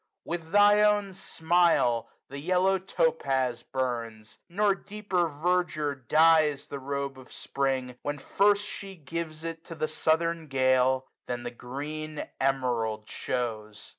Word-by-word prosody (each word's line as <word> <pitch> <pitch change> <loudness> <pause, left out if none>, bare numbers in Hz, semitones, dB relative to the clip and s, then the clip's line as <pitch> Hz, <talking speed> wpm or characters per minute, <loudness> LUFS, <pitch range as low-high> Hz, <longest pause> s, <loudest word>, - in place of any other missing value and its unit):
With 165 -1 -5
thy 205 +1 +6
own 205 -2 +3
smile 165 -10 +2 0.2
the 140 +1 -7
yellow 185 +4 +2
Topaz 135 -9 0
burns. 115 -4 -4
Nor 200 +3 +2
deeper 195 -3 -2
verdure 155 -1 0
dyes 155 +2 +3
the 140 - -6
robe 140 0 -4
of 130 - -15
Spring, 130 -2 -2
When 145 0 -3
first 200 +7 +2
she 195 -2 -7
gives 160 0 -6
it 165 0 -5
to 165 - -8
the 155 - -1
southern 160 +1 0
gale. 130 -1 +2 0.2
Than 120 -1 -3
the 120 - -4
green 150 +5 -6
Emerald 120 -5 0
shows. 110 -4 -4
150 Hz, 130 wpm, -28 LUFS, 130-175 Hz, 0.2 s, thy